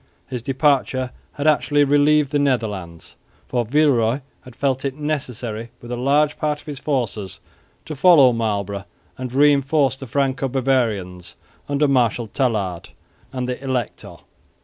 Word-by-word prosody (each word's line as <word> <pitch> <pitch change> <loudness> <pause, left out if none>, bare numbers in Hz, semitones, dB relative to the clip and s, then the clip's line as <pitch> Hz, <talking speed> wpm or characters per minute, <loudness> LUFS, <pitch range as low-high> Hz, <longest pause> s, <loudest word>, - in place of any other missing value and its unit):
His 125 -2 -5
departure 130 -1 +1 0.2
had 145 - -5
actually 145 -1 +3
relieved 145 0 +3
the 145 - +1
Netherlands, 105 -11 -2 0.3
for 125 -2 0
Villeroy 130 -1 +2 0.2
had 125 -2 -14
felt 135 -1 -1
it 135 -1 -2
necessary 125 -7 -4
with 120 - -10
a - - -1
large 145 +4 +1
part 150 -1 -1
of - - -18
his 145 -3 -7
forces 120 - -3 0.5
to 155 - -6
follow 145 -5 +6
Marlborough 100 -3 -2 0.3
and 130 -1 -5
reinforce 140 0 +3
the 135 0 -9
Franco 135 +1 0
Bavarians 115 -9 -1 0.3
under 145 +1 +2
Marshal 125 -3 +2
Tallard 105 -8 -2 0.4
and 125 -1 -3
the 125 +1 -4
Elector. 130 -4 -4
130 Hz, 140 wpm, -21 LUFS, 115-145 Hz, 0.5 s, follow